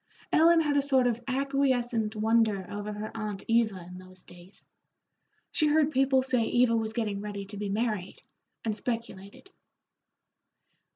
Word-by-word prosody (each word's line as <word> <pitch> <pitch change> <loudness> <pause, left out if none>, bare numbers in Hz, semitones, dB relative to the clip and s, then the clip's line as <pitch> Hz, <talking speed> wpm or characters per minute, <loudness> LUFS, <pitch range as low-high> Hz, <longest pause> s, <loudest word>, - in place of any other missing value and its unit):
Ellen 330 +1 +6
had 295 -2 +1
a - - +4
sort 265 -2 +3
of 240 -1 0
acquiescent 255 -5 0
wonder 215 -3 +1
over 205 +1 -5
her 210 +1 -6
aunt 210 -3 -5
Eva 220 -6 +1
in 180 +1 -10
those 185 0 -14
days. 175 +2 -16 0.9
She 305 - +1
heard 300 0 +3
people 265 -1 +3
say 255 -2 +1
Eva 240 0 +2
was 220 -1 -2
getting 210 -3 -2
ready 205 -1 -6
to 205 +1 -10
be 205 0 -3
married, 210 -3 -3 0.4
and 220 -2 -1
speculated. 230 - -6
225 Hz, 150 wpm, -28 LUFS, 205-260 Hz, 0.9 s, Ellen